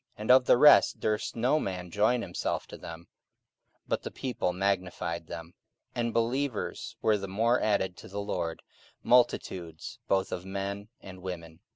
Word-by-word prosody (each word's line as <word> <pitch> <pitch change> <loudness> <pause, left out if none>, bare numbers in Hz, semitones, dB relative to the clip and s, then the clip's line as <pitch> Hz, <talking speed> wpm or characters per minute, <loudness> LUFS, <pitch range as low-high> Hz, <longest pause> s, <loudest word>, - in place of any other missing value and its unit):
44:005:013 - - -11
And 110 - +3
of 130 0 +7
the - - +6
rest 150 +3 +7
durst 105 -1 -1
no 125 +6 +2
man 90 - -4
join 115 +5 +2
himself 90 - -3
to - - -10
them: 85 +1 -9 0.8
but - - 0
the - - -5
people 125 -8 -2
magnified 90 -3 -2
them. 85 +2 -8 0.4
44:005:014 - - -4
And 115 -1 -1
believers 120 +1 -1
were 110 -1 +4
the 100 - -5
more 115 +6 +2
added 95 -4 +1
to - - -11
the 100 +2 -5
Lord, 85 -5 -3 0.4
multitudes 95 -9 +1
both 95 -1 +1
of 90 - -4
men 100 +1 -4
and 95 -1 -11
women.) 85 -3 -7
100 Hz, 170 wpm, -29 LUFS, 90-115 Hz, 0.8 s, of